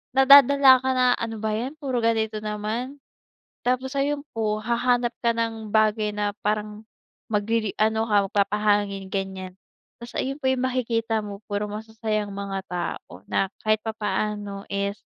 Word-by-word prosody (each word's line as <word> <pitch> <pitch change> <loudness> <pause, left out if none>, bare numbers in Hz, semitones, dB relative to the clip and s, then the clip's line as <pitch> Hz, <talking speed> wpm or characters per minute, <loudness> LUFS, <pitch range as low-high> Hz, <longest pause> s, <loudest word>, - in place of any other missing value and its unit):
nadadala 275 0 +8
ka 260 - +1
na 255 0 +3
"Ano 225 -2 -4
ba 220 - 0
'yan, 255 +7 -4
puro 260 -5 -1
ganito 220 -1 +1
naman." 220 +6 -4 0.7
Tapos 260 +2 0
ayun 285 +1 0
po, 215 -1 0
hahanap 240 +1 +1
ka 235 - +4
ng 225 -2 -3
bagay 215 0 +3
na 205 0 0
parang 210 0 -2 0.5
magriri 215 0 0
ano 220 +1 +2
ka 205 -2 +3
mag-papahangin 205 -1 +1
ganyan, 190 -1 -4 0.4
ta's 235 0 -9
ayun 275 +2 -2
po 265 - -1
yung 260 -1 -1
makikita 230 -3 0
mo 200 -1 -7
puro 205 +1 -1
masasayang 215 -1 -3
mga 195 -1 -4
tao 170 - -5
na 195 - +1 0.2
kahit 215 0 +2
papaano 210 -2 -3
is, 200 +1 -2
215 Hz, 145 wpm, -24 LUFS, 205-240 Hz, 0.7 s, nadadala